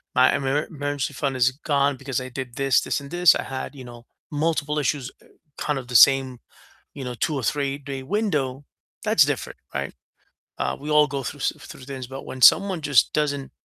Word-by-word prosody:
my 130 +1 +5
emer 140 +2 0
emergency 145 -2 -3
fund 135 -1 -2
is 125 0 +3
gone 140 0 0
because 135 -1 -3
I 130 - -7
did 125 -1 -7
this, 135 -1 +3
this, - - -1
and 140 - -10
this, 175 -3 +5
I - - -2
had, 135 +1 -6
you 130 - -9
know, 120 -1 -12 0.3
multiple 150 -1 0
issues, 135 -2 -1
eh, - - -22 0.3
kind 150 -2 -1
of 125 - -10
the 125 - -5
same, 130 +1 +5 0.6
you 135 - -7
know, 125 -1 -5
2 150 +6 -1
or 135 - -2
three-day 140 +1 -2
window." 145 -6 -1 0.4
That's - - +5
different, - - -3 0.2
right? - - -3 0.7
Uh, - - -1
we 145 +2 -7
all 150 0 +5
go 140 0 -4
through 145 - -6
s - - +1
through - - -12
things, 130 -1 -7
but 135 +2 -8
when 130 - -8
someone 190 +3 +6
just 140 -5 +3
doesn't 145 -2 -1
140 Hz, 200 wpm, -23 LUFS, 130-145 Hz, 0.7 s, someone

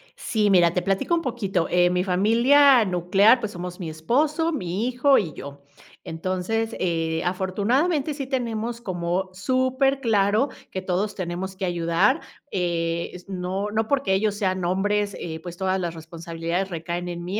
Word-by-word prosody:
Sí, 210 -3 0
mira, 175 -3 +5
te 180 - 0
platico 195 - 0
un 335 - 0
poquito, 200 - -1
eh, 175 0 +4
mi 180 0 +1
familia 235 +8 +5
nuclear, 195 +6 +4
pues 215 -3 -4
somos 180 +1 -7
mi 170 -3 -4
esposo, 290 - 0
mi 195 - -2
hijo 255 +2 +3
y 165 -7 -1
yo. 140 +1 -9 0.4
Entonces, 185 +7 -2
eh, 165 -2 -1
afortunadamente 240 - 0
sí 275 -2 -4
tenemos 235 -3 -3
como 185 -2 -2
superclaro 255 0 +1 0.2
que 190 - -4
todos 185 +3 -1
tenemos 185 +1 -4
que 190 0 -3
ayudar, 175 - +1 0.3
eh, 170 -2 -1
s 180 0 -11
no 190 +2 -3
no 220 +1 0
porque 275 -7 +1
ellos 205 +1 +1
sean 185 -3 -1
hombres, 200 +3 0
eh 160 -1 -5
pues 175 0 -8
todas 190 0 0
las 175 -2 -3
responsabilidades 165 +2 -4
recaen 170 +1 -4
en 175 -1 -5
mí 190 +5 -3
190 Hz, 160 wpm, -24 LUFS, 175-230 Hz, 0.4 s, mira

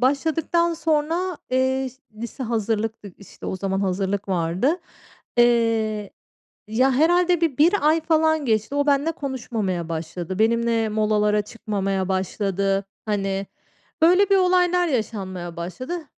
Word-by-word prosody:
başladıktan 320 +5 +1
sonra, 325 +3 0
eee, 260 +1 +1 0.3
lise 235 +4 -6
hazırlıktık, 220 -3 -2
işte, 200 - -11
o 190 - -2
zaman 195 0 -2
hazırlık 195 +1 -1
vardı. 185 - 0 0.6
Eee, 225 -3 +2 0.6
ya, 255 +5 +2
herhâlde 350 +4 +3
bir 320 -6 0
1 335 +7 +5
ay 320 +1 +3
falan 315 -1 +2
geçti. 220 +3 0
O 285 0 +1
benimle 285 +3 +2
konuşmamaya 225 - -3
başladı. 170 +3 -5
Benimle 230 0 +2
molalara 210 -1 +2
çıkmamaya 195 -4 -3
başladı. 195 +1 -1 0.2
Hani, 195 -2 -1 0.6
öyle 365 +4 +5
bir 395 - +6
olaylar 360 -1 +3
yaşanmaya 190 - -3
başladı. 255 - -5
230 Hz, 120 wpm, -23 LUFS, 195-310 Hz, 0.6 s, bir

